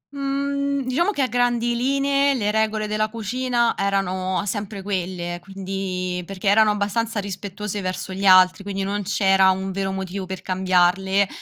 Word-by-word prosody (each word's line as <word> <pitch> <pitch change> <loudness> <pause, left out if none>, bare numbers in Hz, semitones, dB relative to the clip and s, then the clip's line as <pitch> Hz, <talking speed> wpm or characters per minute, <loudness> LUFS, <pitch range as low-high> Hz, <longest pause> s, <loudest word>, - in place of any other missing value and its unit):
Mhmm, 280 0 -1
diciamo 280 +10 +1
che 285 -10 0
a - - +1
grandi 240 -1 +1
linee 275 +2 +2
le 210 -4 0
regole 220 0 0
della 215 0 -1
cucina 235 +2 0
erano 190 -1 -1
sempre 205 0 -4
quelle, 180 -3 -3
quindi 190 -1 -4
perché 195 +1 -2
erano 215 +1 +5
abbastanza 210 +2 -1
rispettose 200 +1 -5
verso 185 +1 -4
gli 195 +1 -5
altri, 185 0 +6
quindi 195 -1 -3
non 205 +1 -2
c'era 190 0 +3
un 190 +1 -1
vero 195 0 -2
motivo 190 0 -5
per 190 0 -6
cambiarle, 190 +1 +2
200 Hz, 150 wpm, -22 LUFS, 190-230 Hz, -, altri